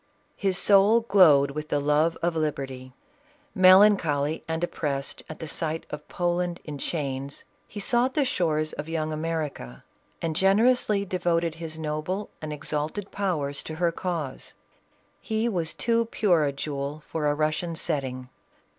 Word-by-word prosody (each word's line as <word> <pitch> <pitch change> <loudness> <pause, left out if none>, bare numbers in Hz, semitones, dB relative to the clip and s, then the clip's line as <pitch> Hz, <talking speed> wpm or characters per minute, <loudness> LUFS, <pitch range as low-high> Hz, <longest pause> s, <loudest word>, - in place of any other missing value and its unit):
His 190 -3 0
soul 205 +3 +5
glowed 165 -11 +5
with 150 +1 -6
the 145 - +1
love 150 +3 +2
of 170 -1 +1
liberty; 135 -4 -3 0.6
melancholy 185 -6 +5
and 160 +1 -2
oppressed 140 -5 -3
at 155 - -7
the 160 - -7
sight 160 +1 -3
)f 150 0 -7
Poland 175 0 -1
in 145 -2 -7
chains, 140 -3 -4 0.2
he 205 - -8
sought 240 +5 +1
the 295 -3 +3
shores 155 -9 0
of 150 +2 -6
young 155 -1 -2
America, 155 - -4 0.4
and 165 -2 -2
generously 205 +2 +3
devoted 170 -3 0
his 160 -1 -5
noble 160 +6 -3
and 155 -1 -5
exalted 150 +6 -4
powers 155 -8 -1
to 155 - -7
her 170 +1 +1
cause. 165 -6 -4 0.7
He 220 +1 -1
was 170 -7 -1
too 230 0 +1
pure 180 -8 +2
a 140 - 0
jewel 140 +1 -5
for 155 -2 -2
a 145 - +2
Russian 155 +3 -1
setting. 130 -6 -3
160 Hz, 145 wpm, -26 LUFS, 150-185 Hz, 0.7 s, soul